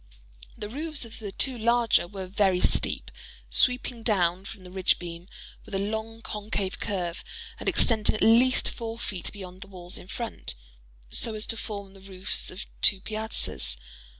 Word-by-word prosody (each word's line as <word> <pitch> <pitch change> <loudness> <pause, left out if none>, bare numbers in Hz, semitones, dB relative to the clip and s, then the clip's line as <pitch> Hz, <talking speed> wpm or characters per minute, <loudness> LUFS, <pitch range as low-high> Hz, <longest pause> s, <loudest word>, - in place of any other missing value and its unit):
The 210 - -5
roofs 295 +3 -2
of 225 - -10
the 205 -3 -5
two 260 +5 +2
larger 235 -4 +3
were 195 0 -6
very 190 -1 +2
steep—sweeping 250 +5 +1
down 185 -4 +1
from 200 -2 -9
the 180 - -11
ridge 185 -1 +3
beam 170 0 -8 0.4
with - - -7
a - - +2
long 220 +3 -3
concave 205 -2 -3
curve, 180 -4 -3 0.4
and - - 0
extending 220 -3 +3
at - - 0
least 245 +3 +5
four 230 -1 -5
feet 200 -6 -4
beyond 185 -2 -10
the 200 - -8
walls 180 -2 -6
in - - -13
front, 230 - -5 0.6
so 225 - +1
as 215 - -1
to - - +1
form 200 -3 -6
the 195 - -15
roofs 190 0 -1
of 185 +3 -7 0.2
two 195 - +4
piazzas. 215 - +3
205 Hz, 165 wpm, -27 LUFS, 185-225 Hz, 0.6 s, least